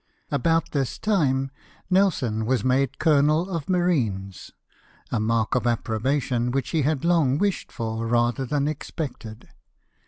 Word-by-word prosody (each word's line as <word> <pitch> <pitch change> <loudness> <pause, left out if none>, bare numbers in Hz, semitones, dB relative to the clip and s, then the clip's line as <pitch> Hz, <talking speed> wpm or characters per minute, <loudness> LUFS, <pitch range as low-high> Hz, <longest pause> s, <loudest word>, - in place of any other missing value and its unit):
About 165 +3 +1
this 135 -4 -1
time 135 -10 +1 0.4
Nelson 140 - +1
was 130 0 +1
made 130 +1 +1
colonel 155 +2 +3
of 165 -3 -4
marines 120 - 0 0.3
— - - -31
a 120 - 0
mark 110 0 0
of 125 -1 +1
approbation 120 +2 0
which 135 0 -1
he 160 - +1
had 145 +1 0
long 160 -6 +3
wished 200 +2 -1
for 115 -1 -3
rather 120 +2 +1
than 140 +2 0
expected. 135 -7 -6
135 Hz, 135 wpm, -24 LUFS, 120-155 Hz, 0.4 s, colonel